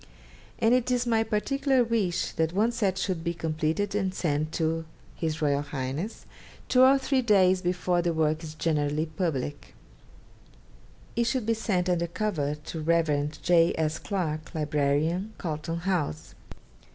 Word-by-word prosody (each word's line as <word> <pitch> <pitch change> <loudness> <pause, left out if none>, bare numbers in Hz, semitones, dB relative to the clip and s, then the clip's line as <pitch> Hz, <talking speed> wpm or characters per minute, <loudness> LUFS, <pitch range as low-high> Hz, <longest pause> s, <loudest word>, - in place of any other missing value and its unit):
And 225 +1 +3
it 255 0 +2
is 250 -1 +1
my 225 -2 +2
particular 255 +5 +1
wish 220 -7 0
that 160 +1 -1
one 215 +5 +2
set 200 -5 0
should 185 -4 -2
be 170 0 -2
completed 160 +4 -1
and 190 -2 0
sent 155 -2 -1
to 165 0 0 0.4
H.R.H. 145 0 -1 0.6
two 255 - +4
or 265 +1 +7
three 265 0 +1
days 190 -5 +4
before 180 0 0
the 170 0 0
work 160 0 0
is 155 -1 -7
generally 150 -1 0
public. 155 -4 -3 1.4
It 235 - +2
should 235 -1 0
be 230 - +2
sent 200 -5 -1
under 175 -1 +1
cover 165 -6 -1
to 150 +2 -7
the - - -5
Rev. 150 -3 +1
J. 170 -1 +4
S. 155 -1 0
Clarke, 165 -5 -3
Librarian, 150 +6 0
Carlton 165 0 -3
House. 165 - -2
170 Hz, 145 wpm, -27 LUFS, 155-210 Hz, 1.4 s, or